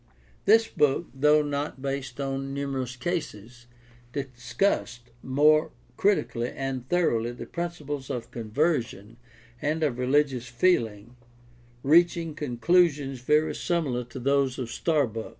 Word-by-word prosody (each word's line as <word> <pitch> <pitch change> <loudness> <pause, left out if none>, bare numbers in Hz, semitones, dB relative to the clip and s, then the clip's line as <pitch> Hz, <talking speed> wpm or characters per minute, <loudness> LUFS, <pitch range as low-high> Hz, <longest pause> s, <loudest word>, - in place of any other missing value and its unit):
This 225 +2 +5
book, 150 +3 +1
though 150 +3 +4
not 145 -1 -3
based 135 -1 -4
on 135 0 -3
numerous 135 -3 -3
cases, 120 - -5 0.5
discussed 125 -1 -2
more 150 +4 +3 0.3
critically 195 - +1
and 135 -2 -5
thor 175 -1 +3
oughly 120 +1 -2
the - - -6
principles 150 -6 -5
of 120 - -5
conversion 115 - -1 0.4
and 155 +2 0
of 130 -5 0
religious 130 -1 +1
feeling, 120 - 0 0.7
reaching 165 +2 +3
conclusions 145 0 +1
very 150 +5 +2
similar 145 -8 -1
to 125 +3 -11
those 140 0 +1
of 120 -3 -4
Starbuck. 125 -10 0
135 Hz, 115 wpm, -27 LUFS, 125-155 Hz, 0.7 s, This